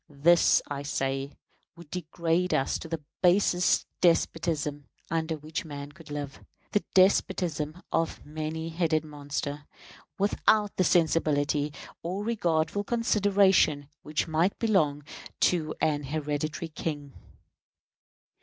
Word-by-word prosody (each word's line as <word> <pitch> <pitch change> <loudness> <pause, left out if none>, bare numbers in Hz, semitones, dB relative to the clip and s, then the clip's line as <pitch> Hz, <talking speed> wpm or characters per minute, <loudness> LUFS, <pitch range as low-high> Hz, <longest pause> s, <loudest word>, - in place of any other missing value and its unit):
This, 160 +4 +4
I 140 -1 -4
say, 135 -1 -2 0.4
would 170 -3 -14
degrade 170 +1 0
us 135 - 0
to - - -8
the 160 -2 -4 0.2
basest 180 -1 +3 0.2
despotism 160 -4 +1 0.2
under 160 -1 -1
which 155 +1 -5
man 145 -2 -7
could 165 0 -15
live 145 -1 -6 0.3
the 210 - +1
despotism 180 -4 +2
of 165 0 0
a - - -18
many 155 +2 -4
headed 160 -2 0
monster, 145 0 -5 0.5
without 205 +1 +2
the 185 - +3
sensibility 150 -4 +2 0.3
or 185 +5 -3
regardful 175 -4 0
consideration 200 -10 +3
which 150 +2 -2
might 165 +4 +1
belong 155 -10 +1 0.4
to 155 -3 +2
an 150 -2 0
hereditary 150 +2 -3
king. 145 -3 -5
160 Hz, 115 wpm, -28 LUFS, 145-180 Hz, 0.5 s, This